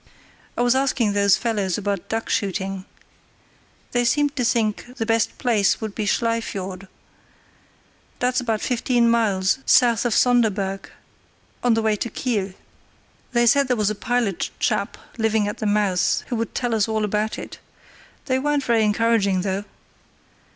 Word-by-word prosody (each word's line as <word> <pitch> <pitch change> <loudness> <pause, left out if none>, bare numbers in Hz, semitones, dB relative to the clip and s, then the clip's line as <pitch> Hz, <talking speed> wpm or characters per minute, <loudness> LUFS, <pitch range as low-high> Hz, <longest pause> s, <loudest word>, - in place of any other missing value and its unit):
"I 240 - +2
was 245 0 +4
asking 260 -5 +1
those 200 -1 +4
fellows 205 -6 -1
about 200 -3 -3
duck 225 0 -2
shooting. 195 -1 -2 1.1
They 245 0 +1
seemed 290 +4 +1
to 255 - -1
think 230 +1 -1
the 225 - -2
best 225 0 0
place 220 -6 +2
would 220 -3 -5
be 210 -1 -3
Schlei 230 +2 +1
Fiord. 190 -2 -6 1.3
That's 250 +1 +1
about 225 -3 -1
fifteen 240 -1 +1
miles 205 -2 +1
south 240 -3 +4
of 240 -3 0
Sonderburg, 205 -6 +1 0.7
on 245 -2 +3
the 225 - 0
way 220 -1 +2
to 235 - -3
Kiel. 210 -7 -2 0.8
They 240 0 +3
said 280 +3 +4
there 250 -1 +1
was 210 -1 +1
a - - -1
pilot 225 -3 -1
chap - - -1 0.2
living 220 -1 +1
at 205 - -5
the 215 - -1
mouth 205 -3 +1
who 245 - -1
would 230 -1 -4
tell 245 -2 -1
us 215 -2 +2
all 220 -1 0
about 210 +1 -1
it. - - -9 0.7
They 260 -2 +1
weren't 290 +1 0
very 230 -3 +2
encouraging 210 -3 +2
though. 195 +1 -2
225 Hz, 160 wpm, -22 LUFS, 205-240 Hz, 1.3 s, was